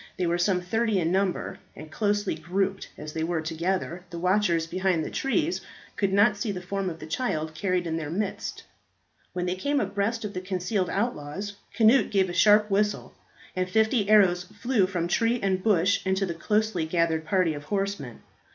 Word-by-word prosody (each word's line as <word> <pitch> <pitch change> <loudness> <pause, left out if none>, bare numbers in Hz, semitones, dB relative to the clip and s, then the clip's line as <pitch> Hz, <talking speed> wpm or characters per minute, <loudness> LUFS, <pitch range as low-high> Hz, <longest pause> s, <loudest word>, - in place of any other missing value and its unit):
They 185 - 0
were 170 +1 0
some 180 0 +2
thirty 220 +3 0
in 165 -1 0
number, 190 -1 -1 0.2
and, 155 0 -10
closely 205 0 0
grouped 195 +2 -2
as 150 0 -7
they 160 - -2
were 170 0 0
together, 170 +2 -2
the 170 - -7
watchers 180 -2 +2
behind 180 -1 0
the - - -5
trees 315 +5 0 0.3
could 200 -2 0
not 205 +2 +4
see 205 +1 -2
the 185 - -4
form 195 +1 -3
of 165 - -7
the 155 - -9
child 155 -4 -2
carried 180 +2 -1
in 165 -1 -2
their 155 -2 -4
midst. 200 +6 -3 0.7
When 180 -1 -2
they 180 - 0
came 285 +10 0
abreast 215 0 -1
of 205 - -5
the 185 - -4
concealed 185 0 -1
outlaws, 200 -2 -3 0.2
Cnut 235 +4 +5
gave 190 -3 +2
a - - -6
sharp 210 +2 +5
whistle, 205 +1 0 0.4
and 185 0 -1
fifty 220 +1 +2
arrows 190 -4 +5
flew 230 -1 0
from 175 -3 -2
tree 230 +6 +1
and 190 -2 0
bush 200 -1 +2
into 190 +1 +1
the 175 - -3
closely 210 -1 0
gathered 165 -1 +1
party 175 -1 +1
of 145 0 -8
horsemen. 195 - -3
190 Hz, 190 wpm, -26 LUFS, 170-210 Hz, 0.7 s, Cnut